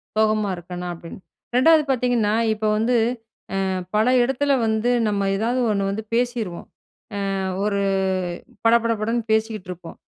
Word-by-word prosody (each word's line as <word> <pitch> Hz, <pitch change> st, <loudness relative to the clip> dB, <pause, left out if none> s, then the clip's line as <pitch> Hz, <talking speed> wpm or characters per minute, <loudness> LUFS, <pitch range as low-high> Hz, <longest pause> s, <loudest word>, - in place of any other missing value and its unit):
சோகமா 215 Hz, -1 st, +2 dB
இருக்கனா 180 Hz, +1 st, -7 dB
அப்டின்னு, 170 Hz, +2 st, -10 dB, 0.4 s
2வது 310 Hz, +4 st, +6 dB
பார்த்தீங்கன்னா, 245 Hz, -4 st, +1 dB, 0.2 s
இப்ப 215 Hz, 0 st, -4 dB
வந்து, 240 Hz, +3 st, +1 dB, 0.7 s
அ -, -, -1 dB, 0.3 s
பல 215 Hz, +2 st, +3 dB, 0.2 s
இடத்துல 270 Hz, +3 st, +1 dB
வந்து 220 Hz, +2 st, +1 dB, 0.2 s
நம்ம 200 Hz, -1 st, 0 dB
ஏதாவது 240 Hz, +5 st, 0 dB
ஒன்னு 200 Hz, -1 st, 0 dB
வந்து 215 Hz, +2 st, -4 dB
பேசிருவோம். 235 Hz, -7 st, -1 dB, 0.7 s
அ -, -, -1 dB, 0.3 s
ஒரு 200 Hz, -1 st, 0 dB, 0.9 s
பட 230 Hz, -, +6 dB
பட 230 Hz, -, +2 dB
படன்னு 230 Hz, +1 st, -1 dB
பேசிக்கிட்டுருப்போம். 195 Hz, -6 st, -3 dB
220 Hz, 130 wpm, -22 LUFS, 200-240 Hz, 0.9 s, 2வது